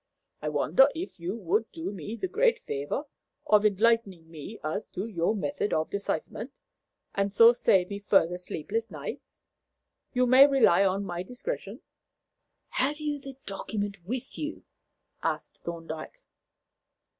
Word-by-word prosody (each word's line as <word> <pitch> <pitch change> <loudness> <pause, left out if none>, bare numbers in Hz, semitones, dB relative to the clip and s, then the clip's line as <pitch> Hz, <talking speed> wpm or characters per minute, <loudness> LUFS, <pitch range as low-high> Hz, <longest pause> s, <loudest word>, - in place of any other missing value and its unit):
I 150 - -1
wonder 155 - +5
if 335 - -6
you 175 +4 -3
would 215 +1 0
do 325 -7 -4
me 200 +3 -6
the 375 - -2
great 465 +5 +3
favour 145 - -2 0.4
of 210 -7 +5
enlightening 200 -5 +1
me 165 +7 -8
as 160 +7 -3
to 190 +3 -4
your 200 -1 0
method 215 +1 -1
of 155 0 0
decipherment, 200 - -3 0.6
and 200 0 0
so 230 +3 +8
save 190 -5 +3
me 200 - -3
further 180 -4 +3
sleepless 210 +6 -3
nights? - - -8 0.6
You 250 0 +2
may 260 +3 +8
rely 245 -10 +5
on 195 +1 +1
my 175 -1 -3
discretion." 250 - -5 0.9
"Have 285 +3 0
you 295 -1 -2
the 275 -1 -10
document 200 -1 -4
with 250 +7 -5
you?" 305 +1 -4 0.6
asked - - -3
Thorndyke. 165 -2 -7
205 Hz, 140 wpm, -28 LUFS, 175-255 Hz, 0.9 s, so